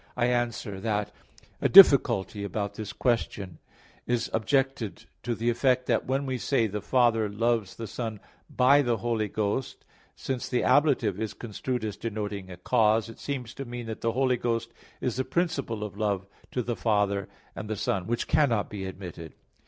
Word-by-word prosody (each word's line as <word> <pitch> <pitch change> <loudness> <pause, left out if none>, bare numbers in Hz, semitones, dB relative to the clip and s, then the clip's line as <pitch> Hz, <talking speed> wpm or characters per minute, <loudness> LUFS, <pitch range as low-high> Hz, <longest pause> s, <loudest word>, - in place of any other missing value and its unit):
I 120 - +2
answer 120 -4 -1
that, 105 -1 -1 0.5
A - - +2
difficulty 125 - +7
about 100 +1 -3
this 105 0 -6
question 100 -8 -1 0.5
is 120 -1 0
objected 135 -1 0 0.2
to 120 -1 -2
the 115 +2 +1
effect 125 +1 +2
that - - 0
when 135 +2 0
we 130 -2 -2
say, 125 -3 +1
"the 105 -1 -3
Father 115 -2 +2
loves 110 -1 0
the 115 - -6
Son 110 0 -5 0.3
by 135 +3 +5
the 120 -4 +1
Holy 115 -2 -1
Ghost," 105 +5 -3 0.3
since 130 -2 -4
the 125 - +1
ablative 130 - +3
is 110 -2 -3
construed 120 +1 -4
as 105 -2 -4
denoting 105 -4 -4
a 90 - -9
cause, 110 +2 +2
it 115 - -12
seems 125 -5 -4
to 140 - -6
mean 120 -1 -6
that 110 -1 -6
the 115 -1 0
Holy 130 0 +2
Ghost 115 -1 -2 0.3
is 125 -1 -1
the 130 - +1
principle 140 -7 -1
of 105 -2 -6
love 100 -3 0 0.2
to 125 - -2
the 120 +1 -2
Father 105 -3 0 0.3
and 105 - -6
the 110 - -1
Son; 95 -2 -1
which 120 0 -1
cannot 120 -9 +2
be 100 -2 -5
admitted. 90 -4 -8
115 Hz, 175 wpm, -27 LUFS, 105-125 Hz, 0.5 s, difficulty